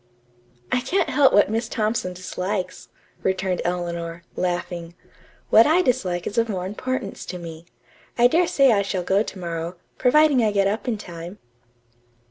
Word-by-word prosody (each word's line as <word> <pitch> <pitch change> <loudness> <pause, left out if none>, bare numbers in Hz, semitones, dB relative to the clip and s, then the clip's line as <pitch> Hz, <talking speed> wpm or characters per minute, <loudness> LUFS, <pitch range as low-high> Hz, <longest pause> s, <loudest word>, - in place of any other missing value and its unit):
"I 250 - +2
can't 380 +9 0
help 285 -2 +5
what 205 0 +4
Miss 225 +1 -1
Thompson 215 -4 -1
dislikes," 185 +1 -4 0.3
returned 190 -1 0
Eleanor, 170 -1 -3
laughing. 175 -1 -3 0.6
"What 225 - +7
I 340 +4 +4
dislike 180 - 0
is 210 - -1
of 230 0 +1
more 185 -3 -2
importance 210 +1 -4
to 180 - -5
me. 165 -1 -9 0.5
I 240 - +5
dare 335 +8 +4
say 275 -2 +4
I 205 -3 +3
shall 195 -2 -2
go 195 +3 +2
to 215 - -5
morrow, 170 -1 -4 0.2
providing 290 0 +5
I 215 -2 +2
get 200 -1 +3
up 210 +5 -1
in 235 -3 0
time." 175 -1 -9
195 Hz, 160 wpm, -23 LUFS, 175-230 Hz, 0.6 s, What